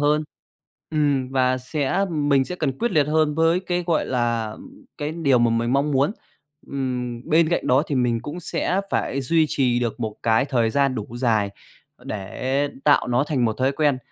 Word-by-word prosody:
hơn. 150 +1 +2 0.7
Ừm, 145 -4 +1
và 130 -1 +1
sẽ 145 +8 -1
mình 145 -3 +2
sẽ 180 - -5
cần 135 -6 -2
quyết 240 - 0
liệt 150 -3 +3
hơn 155 -1 +2
với 165 +3 +2
cái, 180 -2 -2
gọi 165 -2 +1
là, 120 -3 -1
ừm, 275 - -13
cái 150 +1 -3
điều 145 -6 +2
mà 120 0 +3
mình 115 +2 0
mong 140 +2 +1
muốn. 140 +6 +2 0.6
Ừm, 125 -3 -3
bên 160 +1 +4
cạnh 175 - -1
đó 130 +3 +4
thì 145 - -2
mình 120 -3 +1
cũng 150 +9 -7
sẽ 180 +2 -1
phải 140 - -1
duy 160 +5 +2
trì 125 -4 +1
được 120 -1 -3
một 110 -2 -3
cái 115 +3 +3
thời 120 -5 +1
gian 140 +1 +1
đủ 110 -4 -4
dài 110 -5 +1 0.5
để 130 +8 -2 0.2
tạo 145 - +4
nó 125 +3 +2
thành 140 -5 0
một 110 - +2
thói 130 +2 +2
quen. 145 -3 +1
135 Hz, 195 wpm, -23 LUFS, 125-155 Hz, 0.7 s, bên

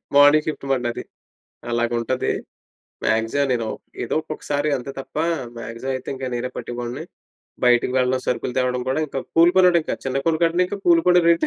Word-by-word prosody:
Morning 145 +2 +7
shift 155 -3 -4
మాట 130 - +2
నాది. 120 - -4 0.7
అలాగుంటది. 120 +1 0 0.7
Maximum 115 +6 +1
నేను 115 -3 -1 0.4
ఏదో - - -2
ఒక్కొక్కసారి 150 -1 -3
అంతే 130 +1 -6
తప్ప. 135 - -13 0.4
మాక్సిమమయితే 125 +3 -5
ఇంక 135 0 -6
నేనే 125 +1 -3
పట్టే 120 - -5
వాడిని. 120 +6 -5 0.6
బయటకి 125 0 +4
వెళ్ళడం, 130 0 +1
సరుకులు 125 0 -1
తేవడం 125 -1 0
కూడా 135 +4 +1
ఇంకా 140 - -4 0.2
కూలు 170 +1 +7
పనోడింక. 180 -3 +4
చిన్న 135 0 -1
కోడుకంటే 165 +2 +2
ఇంకా 200 +2 -5
కూలు 170 -1 +6
కూడా 180 0 +6
రేటు 170 - +4
135 Hz, 155 wpm, -22 LUFS, 120-155 Hz, 0.7 s, Morning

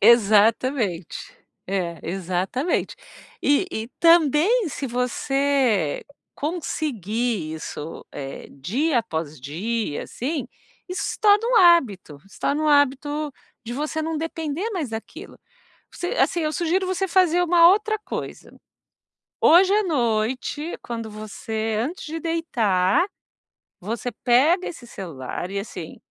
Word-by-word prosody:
Exatamente. 220 - +3 0.3
É, 180 -3 -2
exatamente. 190 - -2 0.5
E 290 +6 +3
e 220 -4 -4
também 335 - +4
se 280 - -4
você 250 - +1 0.3
conseguir 240 - -2
isso, 155 0 -7
eh, 135 -1 -7
dia 240 - 0
após 160 -8 -4
dia, 175 - -3
assim, 280 +3 -4 0.4
isso 365 - -3
se - - -8
torna 420 +1 +5
um - - +3
hábito, 250 - +4
se 195 - -16
torna 295 +2 0
um 305 - +2
hábito 290 +1 +2 0.3
de 235 - -5
você 305 +4 -2
não 320 -1 -2
depender 325 +4 -3
mais 335 - -3
daquilo. 220 0 -8 0.5
Você 355 - -4
assim, 345 - +2
eu 310 -1 -1
sugiro 355 +3 0
você 375 +1 -1
fazer 355 -1 +3
uma 340 -1 +6
outra 430 +3 +2
coisa: - - -6 0.9
hoje 370 +4 +6
à 425 - +3
noite, 255 - -1
quando 230 -2 -5
você 215 +1 -4
antes 315 +7 -4
de 320 +2 -4
deitar, 265 - +1 0.7
você 230 +5 -4
pega 295 +10 +4
esse 255 -8 -9
celular 175 - -6
e, 200 - -3
assim, 185 -5 -7
260 Hz, 120 wpm, -23 LUFS, 210-330 Hz, 0.9 s, uma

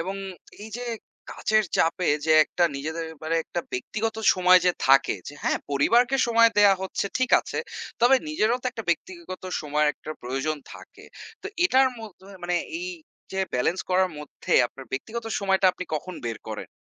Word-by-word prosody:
এবং 190 +4 -3 0.5
এই 220 - -9
যে 245 - -6 0.5
কাজের 215 -1 +1
চাপে 165 +2 +1 0.2
যে 160 - +3
একটা 175 - 0
নিজেদের 160 +3 -4 0.2
মানে 165 +1 0
একটা 175 - -3
ব্যক্তিগত 220 - -3 0.2
সময় 185 0 +6
যে - - +6 0.2
থাকে, 135 0 +5
যে 145 - -9
হ্যাঁ? - - +1
পরিবারকে 240 - +3
সময় 230 0 +5
দেয়া 200 -1 +7
হচ্ছে 190 +1 -2
ঠিক 255 - 0
আছে - - -6 0.4
তবে 245 +3 +6
নিজেরও 240 -6 +1
তো - - -2
একটা 225 -4 -7
ব্যক্তিগত 335 - -4 0.2
সময়ের 150 0 +1
একটা 155 - -10
প্রয়োজন 135 +5 -2 0.2
থাকে। - - -14 0.4
তো - - -5 0.2
এটার 265 -7 +5
মধ্যে 200 -3 -12 0.2
মানে 175 0 0 0.2
এই 360 +1 -4 0.4
যে 190 - -3 0.2
balance 165 +9 0
করার 185 0 +3
মধ্যে 150 - -6
আপনার 135 +1 -12
ব্যক্তিগত 225 - -4 0.2
সময়টা 195 -1 +2
আপনি 185 - -6
কখন 180 +4 -4
বের 115 -2 -3
করেন? - - -5
185 Hz, 170 wpm, -25 LUFS, 155-230 Hz, 0.5 s, দেয়া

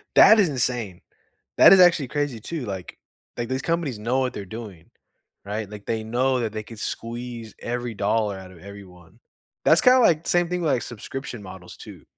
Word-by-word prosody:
That 220 0 +8
is 180 - +2
insane. 120 -8 -2 0.6
That - - +9
is 190 - +8
actually 170 -6 +5
crazy 145 -5 -2
too, 155 +1 -5
like 95 -5 -7 0.4
like, 120 0 -4
these 130 +1 -2
companies 165 -8 -2
know 120 +5 0
what 130 -2 -1
they're 100 - -6
doing, 105 -5 -9 0.6
right? 105 0 -4
Like, 105 -1 -10
they 110 -1 -2
know 125 +3 0
that 110 -2 -2
they 110 -1 -5
can 115 +1 -12
squeeze 115 0 -6
every 120 -1 -4
dollar 105 0 0
outta 95 -3 -13
everyone. 95 -4 -14 0.5
That's 165 - +5
kinda 255 +1 +6
like 165 -9 +3
same 175 -1 +2
thing 180 -1 -2
with, 155 - +1
like, 125 - 0
subscription 120 0 -7
models 95 -2 -11
too. - - -12
120 Hz, 185 wpm, -23 LUFS, 105-135 Hz, 0.6 s, That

